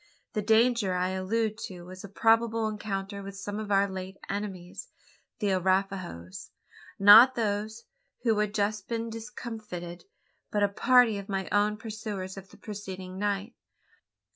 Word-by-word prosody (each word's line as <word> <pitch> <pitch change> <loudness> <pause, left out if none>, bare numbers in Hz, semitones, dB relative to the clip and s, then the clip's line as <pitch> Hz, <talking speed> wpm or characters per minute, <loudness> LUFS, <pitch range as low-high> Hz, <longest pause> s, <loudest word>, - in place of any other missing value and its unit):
The 215 - 0
danger 220 -2 +3
I 180 0 0
allude 215 +4 -1
to 180 -2 -10
was 185 +1 -10
a 200 - -8
probable 225 +2 +2
encounter 200 -2 -4
with 195 0 -8
some 205 +1 -5
of 210 -1 -5
our 200 0 +4
late 190 0 -7
enemies 195 -3 -5 0.5
the 205 - 0
Arapahoes. 185 - -1 0.5
Not 220 +6 +9
those 215 0 -2 0.4
who 225 -3 +2
had 210 -1 +1
just 210 -1 -1
been 230 -1 -3
discomfited; 220 -7 -7 0.4
but 205 -1 +1
a 200 - +3
party 235 0 +4
of 200 - -10
my 195 -1 -2
own 205 +1 +2
pursuers 215 -4 -6
of 195 -1 -10
the - - -16
preceding 190 -3 -7
night. 205 +2 -1
205 Hz, 145 wpm, -28 LUFS, 190-220 Hz, 0.5 s, Not